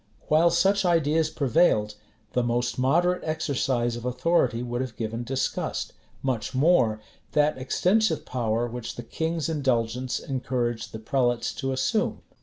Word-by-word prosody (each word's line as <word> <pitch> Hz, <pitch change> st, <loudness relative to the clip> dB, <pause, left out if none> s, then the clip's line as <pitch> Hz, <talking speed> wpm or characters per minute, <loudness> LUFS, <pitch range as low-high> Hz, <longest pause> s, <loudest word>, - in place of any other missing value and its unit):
While 160 Hz, +3 st, +5 dB
such 195 Hz, +4 st, +3 dB
ideas 160 Hz, -3 st, +2 dB
prevailed, 135 Hz, -7 st, +2 dB, 0.4 s
the 125 Hz, -, +2 dB
most 120 Hz, 0 st, -1 dB
moderate 175 Hz, +8 st, +2 dB
exercise 130 Hz, -6 st, 0 dB
of 120 Hz, -, -7 dB
authority 125 Hz, -2 st, +1 dB
would 120 Hz, 0 st, -3 dB
have 130 Hz, -4 st, -5 dB
given 115 Hz, +1 st, -3 dB
disgust; 130 Hz, +2 st, -2 dB, 0.3 s
much 130 Hz, -1 st, -2 dB
more, 130 Hz, -7 st, +3 dB, 0.3 s
that 150 Hz, -2 st, +2 dB
extensive 180 Hz, +7 st, +1 dB
power 115 Hz, -2 st, -1 dB
which 120 Hz, 0 st, -6 dB
the 120 Hz, -, -7 dB
king's 160 Hz, +6 st, -2 dB
indulgence 130 Hz, -5 st, 0 dB
encouraged 125 Hz, -3 st, -2 dB
the -, -, -6 dB
prelates 120 Hz, +1 st, 0 dB
to 135 Hz, -1 st, -3 dB
assume. 170 Hz, -, 0 dB
130 Hz, 135 wpm, -26 LUFS, 120-160 Hz, 0.4 s, While